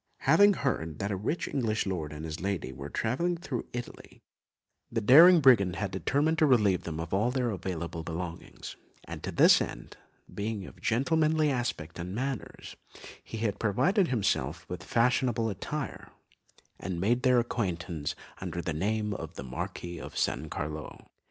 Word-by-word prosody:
Having 205 Hz, 0 st, +6 dB
heard 80 Hz, -, -2 dB
that 100 Hz, +1 st, -2 dB
a -, -, 0 dB
rich 110 Hz, -, -2 dB
English 115 Hz, -5 st, -1 dB
lord 85 Hz, -6 st, -3 dB
and 75 Hz, +1 st, -7 dB
his 80 Hz, 0 st, -5 dB
lady 90 Hz, -9 st, -2 dB
were 70 Hz, +3 st, -7 dB
travelling 170 Hz, -, -1 dB
through 165 Hz, -8 st, -5 dB
Italy, 120 Hz, -1 st, -8 dB, 0.7 s
the 115 Hz, -, 0 dB
daring 165 Hz, -, +8 dB
brigand 100 Hz, -9 st, +5 dB
had 100 Hz, -2 st, -3 dB
determined 145 Hz, +11 st, +1 dB
to 155 Hz, -, +5 dB
relieve 105 Hz, -8 st, +3 dB
them 80 Hz, -1 st, -4 dB
of 80 Hz, +1 st, -5 dB
all 105 Hz, +5 st, +2 dB
their 125 Hz, -2 st, 0 dB
available 85 Hz, -3 st, -4 dB
belongings, 85 Hz, +1 st, -6 dB, 0.3 s
and -, -, -8 dB
to -, -, -4 dB
this -, -, +6 dB
end, -, -, -6 dB, 0.4 s
being 105 Hz, -1 st, -3 dB
of -, -, -13 dB
gentlemanly 155 Hz, +5 st, +2 dB
aspect 115 Hz, -, -3 dB
and 90 Hz, +3 st, -5 dB
manners, 130 Hz, 0 st, -5 dB, 0.5 s
he 115 Hz, -, -7 dB
had 105 Hz, -3 st, -1 dB
provided 180 Hz, -, +2 dB
himself 115 Hz, -8 st, -1 dB
with 90 Hz, -2 st, -6 dB
fashionable 120 Hz, +1 st, +1 dB
attire, 145 Hz, +9 st, -5 dB, 0.7 s
and 90 Hz, -1 st, -4 dB
made 120 Hz, +7 st, +2 dB
their 125 Hz, -1 st, +4 dB
acquaintance 85 Hz, -10 st, -2 dB, 0.2 s
under 85 Hz, -, -4 dB
the 85 Hz, -1 st, -2 dB
name 105 Hz, +5 st, -1 dB
of 80 Hz, -4 st, -7 dB
the -, -, -6 dB
Marquis 85 Hz, +6 st, -5 dB
of -, -, -8 dB
San 75 Hz, -, -1 dB
Carlo. 75 Hz, +1 st, -6 dB
105 Hz, 160 wpm, -29 LUFS, 85-125 Hz, 0.7 s, daring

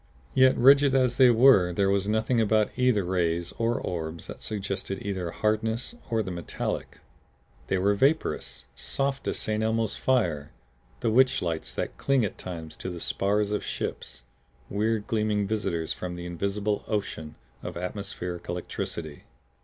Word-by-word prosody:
Yet 130 Hz, 0 st, +5 dB
rigid 140 Hz, +2 st, +6 dB
as 125 Hz, -2 st, +2 dB
they 130 Hz, -2 st, +7 dB
were 115 Hz, -7 st, +6 dB
there 95 Hz, +2 st, +2 dB
was 100 Hz, 0 st, +1 dB
nothing 110 Hz, +3 st, +2 dB
about 110 Hz, -1 st, +2 dB
either 125 Hz, -5 st, +3 dB
rays 85 Hz, -2 st, 0 dB
or 115 Hz, +1 st, +1 dB
orbs 80 Hz, -1 st, -4 dB
that -, -, -9 dB
suggested 100 Hz, -2 st, -3 dB
either 95 Hz, -4 st, -2 dB
hardness 110 Hz, -, -1 dB, 0.2 s
or 115 Hz, -1 st, +1 dB
the 95 Hz, -, -5 dB
metallic. 85 Hz, -2 st, -4 dB, 0.7 s
They 95 Hz, -, +1 dB
were 100 Hz, +2 st, +3 dB
vaporous, 140 Hz, +10 st, 0 dB
soft 135 Hz, 0 st, -2 dB
as -, -, -1 dB
St. 110 Hz, 0 st, -1 dB
Elmo's 110 Hz, -1 st, 0 dB
fire, 85 Hz, -, 0 dB, 0.5 s
the 115 Hz, -, +1 dB
witch 130 Hz, 0 st, +4 dB
lights 80 Hz, -2 st, -2 dB
that -, -, -3 dB
cling 135 Hz, -5 st, +2 dB
at 100 Hz, -, -6 dB
times 80 Hz, -3 st, -7 dB
to -, -, -5 dB
the 90 Hz, -1 st, -6 dB
spars 100 Hz, +4 st, 0 dB
of 105 Hz, -, -1 dB
ships, 65 Hz, -1 st, -5 dB, 0.5 s
weird 110 Hz, +1 st, 0 dB
gleaming 105 Hz, -2 st, 0 dB
visitors 90 Hz, -6 st, -1 dB
from 90 Hz, -1 st, -5 dB
the 90 Hz, 0 st, -7 dB
invisible 100 Hz, +4 st, -2 dB
ocean 80 Hz, -7 st, -3 dB, 0.3 s
of -, -, -6 dB
atmospheric 90 Hz, -1 st, -5 dB
electricity. 85 Hz, -3 st, -5 dB
100 Hz, 155 wpm, -27 LUFS, 90-115 Hz, 0.7 s, they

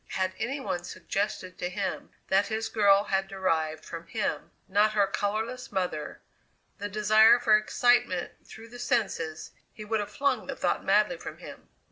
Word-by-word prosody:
Had 185 Hz, -1 st, 0 dB
any 265 Hz, +6 st, -2 dB
one 175 Hz, -9 st, -3 dB
suggested 185 Hz, +1 st, -4 dB
to 180 Hz, -, -2 dB
him 190 Hz, 0 st, -4 dB, 0.2 s
that 195 Hz, +1 st, +3 dB
his 220 Hz, +1 st, -2 dB
girl 200 Hz, -2 st, +4 dB
had 195 Hz, -1 st, -1 dB
derived 160 Hz, -5 st, -1 dB
from 170 Hz, 0 st, -8 dB
him 215 Hz, +1 st, -2 dB, 0.2 s
not 205 Hz, +2 st, +3 dB
her 205 Hz, -2 st, +4 dB
colourless 220 Hz, +6 st, -3 dB
mother 180 Hz, -6 st, -3 dB, 0.6 s
the 205 Hz, +1 st, -4 dB
desire 215 Hz, +3 st, +6 dB
for 225 Hz, -3 st, +4 dB
excitement 215 Hz, -4 st, +2 dB
through 225 Hz, +1 st, -12 dB
the 245 Hz, +1 st, -11 dB
senses, 195 Hz, -10 st, -2 dB, 0.2 s
he 215 Hz, -, -10 dB
would 220 Hz, +1 st, 0 dB
have 205 Hz, -, -3 dB
flung 275 Hz, -2 st, 0 dB
the -, -, -4 dB
thought -, -, -1 dB
madly -, -, +3 dB
from -, -, -8 dB
him. -, -, -12 dB
205 Hz, 165 wpm, -28 LUFS, 185-220 Hz, 0.6 s, desire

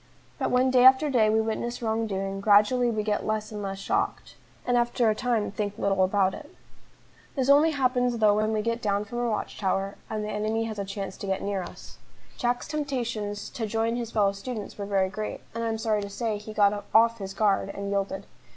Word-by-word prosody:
But -, -, 0 dB
when 255 Hz, +1 st, +3 dB
day 250 Hz, -1 st, +5 dB
after 265 Hz, +3 st, +6 dB
day 225 Hz, -4 st, +4 dB
we 220 Hz, +1 st, +3 dB
witness 225 Hz, +2 st, -3 dB
wrong 225 Hz, 0 st, 0 dB
doing, 195 Hz, -1 st, -3 dB
gradually 215 Hz, +5 st, +4 dB
we 215 Hz, -2 st, -1 dB
get 210 Hz, -1 st, -1 dB
less 215 Hz, 0 st, -2 dB
and 210 Hz, -1 st, -5 dB
less 195 Hz, -1 st, -4 dB
shocked, 195 Hz, -, -2 dB, 0.3 s
and 245 Hz, -, +1 dB
after 240 Hz, -1 st, +2 dB
a -, -, +2 dB
time 230 Hz, -2 st, -1 dB
think 205 Hz, 0 st, -3 dB
little 195 Hz, -3 st, +2 dB
about 190 Hz, 0 st, +2 dB
it. -, -, -9 dB, 0.9 s
This 265 Hz, -1 st, 0 dB
only 290 Hz, +3 st, +6 dB
happens 250 Hz, -4 st, +1 dB
though 210 Hz, -2 st, +4 dB
when 215 Hz, +1 st, +1 dB
we 215 Hz, -1 st, 0 dB
get 230 Hz, +1 st, -1 dB
down 205 Hz, -1 st, 0 dB
from 240 Hz, +3 st, -5 dB
our 240 Hz, -1 st, 0 dB
watch 215 Hz, -, -3 dB
tower, 195 Hz, 0 st, -1 dB
and 215 Hz, -1 st, -3 dB
the 210 Hz, -, -4 dB
enemy 215 Hz, +2 st, -1 dB
has 220 Hz, -2 st, -5 dB
a 200 Hz, -, -2 dB
chance 195 Hz, -1 st, -5 dB
to 200 Hz, -, -6 dB
get 190 Hz, 0 st, -1 dB
near 200 Hz, -2 st, -2 dB
to -, -, -7 dB
us. -, -, -13 dB, 0.4 s
Jack's 245 Hz, -1 st, -1 dB
temptations 235 Hz, -9 st, -3 dB
to 225 Hz, -2 st, -3 dB
join 225 Hz, +2 st, 0 dB
his 240 Hz, -2 st, -3 dB
fellow 205 Hz, -3 st, +2 dB
students 210 Hz, +2 st, -6 dB
were 200 Hz, -1 st, -5 dB
very 195 Hz, -2 st, +2 dB
great, 215 Hz, +3 st, -5 dB
and 230 Hz, 0 st, -3 dB
I -, -, 0 dB
am 225 Hz, 0 st, -1 dB
sorry 220 Hz, -2 st, 0 dB
to 200 Hz, -, -5 dB
say, 215 Hz, 0 st, -2 dB
he 210 Hz, +1 st, -9 dB
got 205 Hz, -1 st, +2 dB
"off 230 Hz, +1 st, +5 dB
his 195 Hz, 0 st, -6 dB
guard," 200 Hz, -2 st, +2 dB
and 200 Hz, 0 st, -5 dB
yielded. 195 Hz, 0 st, -2 dB
215 Hz, 225 wpm, -27 LUFS, 200-235 Hz, 0.9 s, after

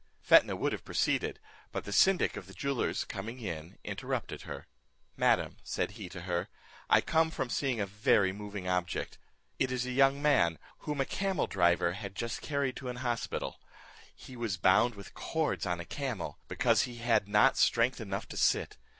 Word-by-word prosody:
Fetnah -, -, +5 dB
would -, -, 0 dB
have -, -, -4 dB
proceeded, -, -, 0 dB, 0.3 s
but -, -, -3 dB
the 100 Hz, -, -7 dB
syndic 190 Hz, -, +4 dB
of 100 Hz, -3 st, -7 dB
the 95 Hz, -, -13 dB
jewellers 140 Hz, +6 st, -1 dB
coming 110 Hz, +4 st, -6 dB
in 85 Hz, -6 st, -6 dB
interrupted -, -, -4 dB
her: -, -, -7 dB, 0.5 s
"Madam," -, -, +2 dB
said -, -, -2 dB
he 100 Hz, -3 st, -8 dB
to 90 Hz, -, -8 dB
her, 85 Hz, -1 st, -2 dB, 0.4 s
"I -, -, +6 dB
come 160 Hz, 0 st, +2 dB
from 130 Hz, -6 st, -3 dB
seeing 130 Hz, -5 st, 0 dB
a 100 Hz, -, +1 dB
very 100 Hz, -1 st, +3 dB
moving 100 Hz, -2 st, -6 dB
object, 90 Hz, -1 st, -2 dB, 0.4 s
it 130 Hz, -, +1 dB
is 125 Hz, -1 st, -1 dB
a 125 Hz, -, -3 dB
young 135 Hz, +2 st, +4 dB
man, 130 Hz, -, +3 dB, 0.2 s
whom 145 Hz, -2 st, -2 dB
a -, -, +1 dB
camel 195 Hz, 0 st, -1 dB
driver 85 Hz, -2 st, +2 dB
had 100 Hz, 0 st, -7 dB
just 115 Hz, +2 st, -3 dB
carried 140 Hz, -3 st, -1 dB
to 130 Hz, -, -5 dB
an 125 Hz, -, -4 dB
hospital: 120 Hz, -1 st, -2 dB, 0.6 s
he 130 Hz, -, -12 dB
was 115 Hz, -6 st, -2 dB
bound 100 Hz, +7 st, +4 dB
with 100 Hz, -1 st, -11 dB
cords 160 Hz, -10 st, -1 dB
on 90 Hz, -1 st, -1 dB
a 85 Hz, -, -6 dB
camel, 130 Hz, -4 st, -4 dB
because -, -, +3 dB
he 120 Hz, -, -3 dB
had 115 Hz, -3 st, +1 dB
not 105 Hz, +6 st, +5 dB
strength 120 Hz, +2 st, +3 dB
enough 100 Hz, -2 st, -4 dB
to -, -, -7 dB
sit. -, -, +2 dB
110 Hz, 185 wpm, -31 LUFS, 95-130 Hz, 0.6 s, I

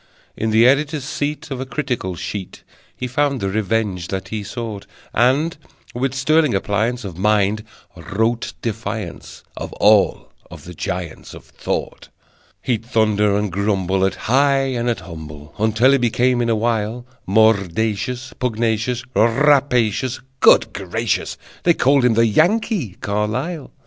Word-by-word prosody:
In 110 Hz, -, -1 dB
the 110 Hz, +2 st, +5 dB
editor's 145 Hz, +2 st, +2 dB
seat 145 Hz, +2 st, -4 dB
Of 130 Hz, -1 st, -3 dB
a -, -, -3 dB
critical 125 Hz, -9 st, -3 dB
sheet 95 Hz, +2 st, -6 dB, 0.3 s
He 125 Hz, -, -4 dB
found 140 Hz, +2 st, 0 dB
the 95 Hz, -, -1 dB
revenge 105 Hz, -3 st, -1 dB
that 95 Hz, 0 st, -4 dB
he 110 Hz, 0 st, -3 dB
sought; 110 Hz, -2 st, -6 dB, 0.3 s
And, 135 Hz, +8 st, +2 dB, 0.4 s
with 130 Hz, +2 st, -2 dB
sterling 150 Hz, -1 st, +2 dB
appliance 110 Hz, +5 st, -1 dB
of 90 Hz, -3 st, -7 dB
Mind, 105 Hz, +1 st, +2 dB, 0.3 s
wrote 115 Hz, +3 st, -1 dB
defiance 110 Hz, -5 st, -5 dB
of -, -, -6 dB
All 105 Hz, -1 st, +3 dB, 0.2 s
of -, -, -11 dB
the 90 Hz, -, -9 dB
giants 85 Hz, 0 st, -5 dB
of -, -, -12 dB
Thought. -, -, -5 dB, 0.5 s
He'd 115 Hz, -4 st, -1 dB
thunder 105 Hz, -3 st, +2 dB
and 105 Hz, -2 st, -1 dB
grumble 95 Hz, -1 st, 0 dB
At 95 Hz, -1 st, +1 dB
high 135 Hz, +1 st, +3 dB
and 120 Hz, 0 st, -1 dB
at 120 Hz, -, -2 dB
humble 75 Hz, -3 st, -10 dB
Until 110 Hz, +4 st, +3 dB
he 140 Hz, -, +4 dB
became, 120 Hz, +1 st, +2 dB
in 115 Hz, -, 0 dB
a 115 Hz, -, +3 dB
while, 115 Hz, +1 st, -1 dB, 0.2 s
Mordacious, 110 Hz, +4 st, +1 dB
pugnacious, 115 Hz, 0 st, -1 dB
Rapacious. 125 Hz, -1 st, +2 dB, 0.2 s
Good 110 Hz, -1 st, +5 dB
gracious! 105 Hz, +4 st, -2 dB, 0.2 s
They 170 Hz, -1 st, +3 dB
called 135 Hz, -1 st, +3 dB
him 120 Hz, -3 st, +3 dB
the 115 Hz, +1 st, +4 dB
Yankee 165 Hz, -, +1 dB
Carlyle! 125 Hz, -, -2 dB
115 Hz, 140 wpm, -20 LUFS, 100-130 Hz, 0.5 s, the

